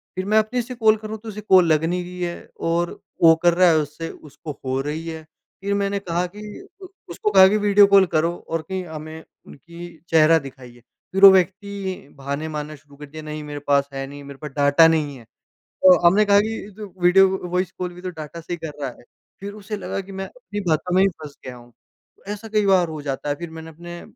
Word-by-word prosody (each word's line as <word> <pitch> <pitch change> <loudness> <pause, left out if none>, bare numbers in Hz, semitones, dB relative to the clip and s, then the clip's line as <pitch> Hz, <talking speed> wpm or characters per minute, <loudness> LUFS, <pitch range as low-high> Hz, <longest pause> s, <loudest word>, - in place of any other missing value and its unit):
फिर 185 +1 -3
मैं 215 +2 +2
अपने 240 +3 -1
से 250 +1 -8
कॉल 220 -2 +4
कर 215 0 -8
रहा 215 - -6
हूँ 220 - -6
तो 225 - -7
उसे 210 0 -7
कॉल 190 -3 +5
लग 155 +1 +1
नहीं 180 +1 -1
रही 180 0 -9
है 175 0 -5
और 170 +1 0 0.3
वो 165 -1 +8
कर 175 -1 +5
रहा 180 +1 +4
है 160 - +4
उससे 155 +2 -4
उसको 150 0 -10
हो 130 +1 -1
रही 155 +3 -5
है। 160 -1 -6 0.4
फिर 200 +1 -1
मैंने 200 0 -1
कहा 175 -1 -2
कि 210 - -9 0.7
उसको 425 -2 -2
कहा 190 0 +8
कि 210 +2 +2
वीडियो 205 -1 +5
कॉल 200 -1 +6
करो 165 +2 +2 0.2
और 165 -1 -1
कही 190 +4 -5
हमें 160 -1 -9 0.2
उनकी 170 +5 -11 0.2
चेहरा 160 0 +5
दिखाइए। 130 -3 -12 0.3
फिर 195 +1 0
वो - - +13
व्यक्ति 190 -2 -1
बहाने 140 +3 -4
मारना 150 0 -5
शुरू 145 0 -20
कर 150 - -9
दिया 155 +2 -10
नहीं 150 0 -6
मेरे 145 0 -7
पास 140 0 +2
है 135 0 -4
नहीं, 145 0 -10
मेरे 140 -1 -11
पास 150 -2 -7
डाटा 145 +3 +6
नहीं 150 -4 0
है, 120 - -14 0.4
तो 185 -2 +4
हमने 210 +4 +4
कहा 200 0 +5
कि 210 -1 -4
तू 205 -4 -9
वीडियो 190 +2 +6 0.2
वॉइस 180 0 -1
कॉल 180 -1 -4
भी 180 - -12
तो 185 - -4
डाटा 165 0 -9
से 170 - -6
ही 175 - -3
कर 150 - -5
रहा 135 - -2
है। - - -18 0.4
फिर 200 +1 -7
उसे 210 0 -6
लगा 190 +1 -4
कि 195 +1 -13
मैं 195 0 -5
अपनी 485 - -8
बातों 175 +3 0
में 190 - +5
ही 195 - +5 0.2
फँस 145 -2 -10
गया 125 -1 -7
हूँ। 120 0 -16 0.6
ऐसा 210 +2 -6
कई 210 -1 +1
बार 185 -3 +4
हो 155 -2 -6
जाता 140 0 -4
है 145 - 0
फिर 170 +1 -7
मैंने 160 0 -9
अपने 175 +2 -10
175 Hz, 240 wpm, -22 LUFS, 150-195 Hz, 0.7 s, वो